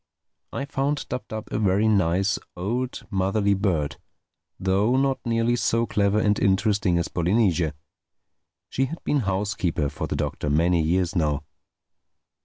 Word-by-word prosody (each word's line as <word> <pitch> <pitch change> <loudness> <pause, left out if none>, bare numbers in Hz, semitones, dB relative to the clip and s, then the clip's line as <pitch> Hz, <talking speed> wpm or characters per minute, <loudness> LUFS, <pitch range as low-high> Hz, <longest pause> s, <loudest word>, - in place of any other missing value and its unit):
I 140 - -3
found 140 +1 -1
Dab 125 - -4
Dab 110 0 -6
a - - -1
very 100 +1 +2
nice, 95 -1 +2 0.2
old, 120 +8 -3
motherly 100 +1 +1
bird—though 95 - -2
not 135 0 +1
nearly 115 +1 +2
so 115 -1 +1
clever 100 -2 +1
and 105 -1 +2
interesting 100 -2 +2
as 85 - 0
Polynesia. 85 -4 +1 0.9
She 135 - 0
had 165 +5 -7
been 145 - +1
housekeeper 95 - -1
for 70 - -5
the - - -3
Doctor 75 - -2
many 85 +3 +3
years 85 +2 0
now. 75 -3 0
100 Hz, 135 wpm, -24 LUFS, 85-115 Hz, 0.9 s, many